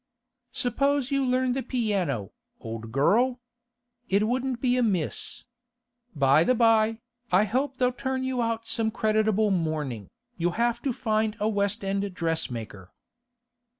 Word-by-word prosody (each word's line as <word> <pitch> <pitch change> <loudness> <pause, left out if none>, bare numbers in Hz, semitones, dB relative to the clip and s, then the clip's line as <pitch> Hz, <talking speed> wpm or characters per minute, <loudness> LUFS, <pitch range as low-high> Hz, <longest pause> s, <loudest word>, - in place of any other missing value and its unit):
'Suppose 275 +2 0
you 275 0 +2
learn 255 0 +1
the 265 +2 -1
piano, 195 - -1 0.3
old 115 0 -7
girl? 235 - +2 0.7
It 200 +2 +2
wouldn't 255 +1 -1
be 250 0 +2
amiss. 205 -10 -1 0.7
By 140 +2 +4
the 255 - +2
by, 225 -1 +3 0.3
I 185 +3 +5
hope 260 +6 -1
they'll 250 -1 +2
turn 260 0 -3
you 260 -1 -1
out 230 -1 -1
some 225 -2 +1
creditable 215 -1 +1
mourning. 155 - -2 0.3
You'll 175 0 0
have 235 0 +1
to 275 - -1
find 215 -2 -1
a 210 - +1
West 205 0 0
End 195 +1 -1
dressmaker. 115 - -3
220 Hz, 135 wpm, -26 LUFS, 175-250 Hz, 0.7 s, I